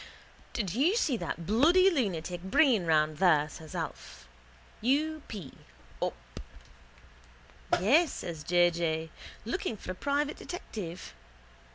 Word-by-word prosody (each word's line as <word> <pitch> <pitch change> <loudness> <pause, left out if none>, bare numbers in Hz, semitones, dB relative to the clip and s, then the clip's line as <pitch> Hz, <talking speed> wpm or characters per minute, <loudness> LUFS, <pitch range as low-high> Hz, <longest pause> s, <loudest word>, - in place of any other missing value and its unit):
—Did 200 -8 -2
you 305 - +3
see 305 - +1
that 170 -3 -5
bloody 335 - +5
lunatic 180 - -2
Breen 205 - +3
round 155 -1 +2
there? 155 -4 +4
says 155 +1 -10
Alf. - - -6 0.5
U. 305 +6 +1
p: 190 -11 -8 0.5
up. - - -1 1.6
—Yes, 280 - +4
says 160 -3 -6
J. 175 +1 +4
J. 160 -1 -2 0.3
Looking 230 -1 -2
for 185 - -6
a - - -3
private 285 +8 -1
detective. 190 - -7
190 Hz, 120 wpm, -30 LUFS, -, 1.6 s, bloody